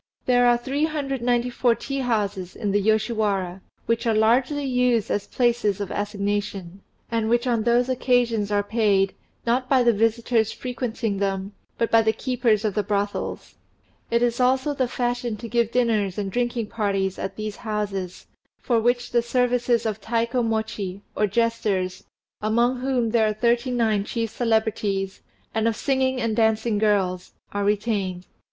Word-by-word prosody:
There 245 -1 +4
are 240 0 +5
394 255 -3 0
tea 275 +3 -4
houses 205 -7 -1
in 205 - -2
the 205 +1 +2
Yoshiwara, 210 -4 0 0.2
which 230 +1 0
are 225 - +2
largely 250 +7 +2
used 250 -4 +1
as 205 - -1
places 235 -5 +1
of 200 -2 -4
assignation, 200 -2 -3 0.3
and 225 -1 0
which 240 +2 +2
on 235 -3 +1
those 240 +2 +2
occasions 245 -5 +1
are 205 0 +2
paid, 205 -3 +2 0.3
not 250 +2 +1
by 260 -2 +4
the 235 -1 +4
visitors 225 +1 +1
frequenting 240 -4 -3
them, 195 0 -2 0.3
but 230 - 0
by 225 - +6
the 220 0 +2
keepers 240 -5 0
of 210 - 0
the 210 - +1
brothels. 205 +1 -3 0.6
It 235 +1 +2
is 240 0 +1
also 260 +3 +2
the 260 -3 0
fashion 245 -2 -2
to 230 - -7
give 235 -1 +1
dinners 220 -6 +1
and 200 -2 -2
drinking 240 0 -1
parties 195 -3 -1
at 190 0 -4
these 215 -1 -5
houses, 200 -4 -4 0.3
for 235 -3 +1
which 245 +2 0
the 240 - +3
services 245 -1 +1
of 215 -1 -2
Taikomochi, 220 -4 -1
or 210 - +2
jesters, 200 -4 -1 0.4
among 235 +4 +2
whom 250 -3 0
there 225 -2 +3
are 215 - 0
thirty 235 +3 +1
nine 225 -5 +1
chief 225 +1 -3
celebrities, 215 -4 -1 0.3
and 220 0 +1
of 225 - +1
singing 265 0 0
and 230 -3 -1
dancing 220 -1 +2
girls, 195 -4 0 0.2
are 205 0 -2
retained. 200 -3 -1
225 Hz, 155 wpm, -24 LUFS, 205-245 Hz, 0.6 s, by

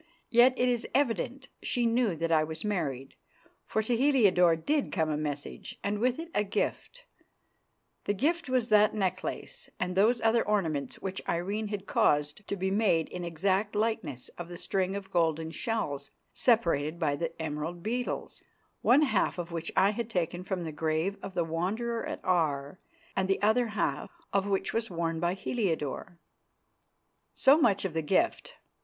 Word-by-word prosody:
Yet 245 +2 +6
it 250 - +2
is 240 -1 0
evident 270 0 0
she 245 -1 0
knew 230 -5 +2
that 165 +1 -2
I 155 -1 +4
was 160 +4 -5
married, 145 -10 -2 0.5
for 220 - 0
to 235 +3 +1
Heliodore 205 - +4
did 285 - 0
come 160 -4 0
a - - 0
message, 145 -1 -5
and 205 +1 -1
with 250 +2 +1
it 330 +1 -7
a 210 - +2
gift. - - -3 1.0
The 205 - 0
gift 325 - 0
was 255 -2 +1
that 215 0 +5
necklace 195 - -3
and 180 0 -2
those 225 +5 +4
other 225 +1 +3
ornaments 160 -10 -1
which 190 0 -3
Irene 200 +6 -1
had 205 -2 -5
caused 150 +2 +1
to - - -2
be 190 0 -1
made 195 -6 +2
in - - -6
an 175 - -4
exact 190 +5 0
likeness 210 - -2
of 175 0 -6
the 175 - -7
string 190 +1 -1
of 195 -1 -6
golden 160 -2 +1
shells 165 - -3 0.2
separated 170 - +2
by 155 -4 +1 0.2
emerald 160 +2 -4
beetles, 245 +3 -3 0.4
one 280 +5 +5
half 225 -11 +1
of 175 -1 -5
which 165 -1 -4
I 195 - +5
had 230 +1 -4
taken 175 -3 -2
from 185 -2 -3
the 160 - -4
grave 160 +5 -1
of 195 -1 -7
the 170 - +2
Wanderer 205 +9 -2
at - - -6
Aar 155 -3 0 0.4
and 190 0 +1
the 195 - +2
other 230 +3 +3
half 200 -10 -2 0.2
of 195 0 +2
which 195 -1 0
was 230 0 -1
worn 165 -2 -2
by 175 +2 0
Heliodore. 175 - -2 1.2
So 280 +4 +6
much 205 -9 +3
of 185 - -2
the 160 - 0
gift. 345 - 0
190 Hz, 170 wpm, -29 LUFS, 165-225 Hz, 1.2 s, Yet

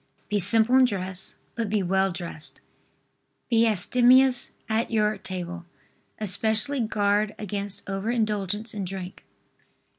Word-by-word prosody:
Be 210 - +1
simple 225 +5 +4
in 260 - +6
dress, 190 -4 -4 0.2
but 230 -3 -3
be 205 -1 0
well 190 +1 +1
dressed. 170 -3 -5 0.9
Be 230 0 +4
abstemious 245 +5 +3
at 220 +1 -1
your 215 -1 +1
table. 175 -2 -6 0.5
Especially 220 +6 +2
guard 210 -2 0
against 200 -1 -4
over 195 +2 -3
indulgence 215 -2 -2
in 205 -2 -4
drink. 185 0 -7
210 Hz, 120 wpm, -25 LUFS, 190-225 Hz, 0.9 s, in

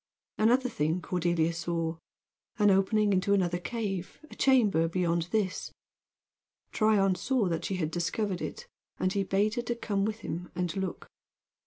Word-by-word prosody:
Another 245 +4 +4
thing 160 -6 0
Cordelia 170 -2 0
saw: 165 -1 -2 0.6
an 205 -1 +5
opening 205 +2 +3
into 190 +2 +2
another 175 -2 +1
cave, 195 -3 -4
a - - -10
chamber 215 -12 +3
beyond 170 -1 0
this. 200 -2 -1 1.0
Tryon 210 -3 +3
saw 225 +4 0
that 165 -1 -2
she 195 - -2
had 160 -4 -2
discovered 180 +3 -1
it, 480 - -5 0.3
and 185 +1 0
he 200 - +1
bade 195 +2 +1
her 240 - -1
to 235 0 -3
come 205 -4 -1
with 215 +2 -2
him 180 -1 -5
and 180 0 -2
look. 190 -2 -4
190 Hz, 155 wpm, -29 LUFS, 175-215 Hz, 1.0 s, an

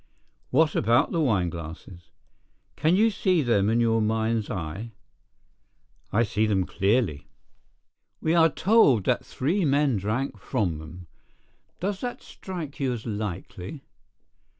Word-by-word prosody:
"What 155 +4 +3
about 120 +3 +2
the 165 - 0
wineglasses?" 90 - -3 0.7
"Can 160 +4 +2
you 220 +3 +4
see 185 -5 +1
them 105 -5 +2
in 115 +1 +2
your 115 -1 +2
mind's 110 0 0
eye?" 95 +6 -5 1.2
"I 115 +3 +3
see 110 0 0
them 95 -3 +1
clearly." 100 - 0 0.9
"We 160 - 0
are 165 -1 +5
told 155 - +4
that - - +1
three 170 +9 -1
men 140 -4 +2
drank 110 +8 -2
from 95 - -1
them. 85 +3 -10 0.7
Does 195 +2 -3
that 245 -1 -5
strike 165 -6 -8
you 135 -3 0
as 115 -3 -7
likely?" 105 - -5
115 Hz, 125 wpm, -26 LUFS, 100-150 Hz, 1.2 s, are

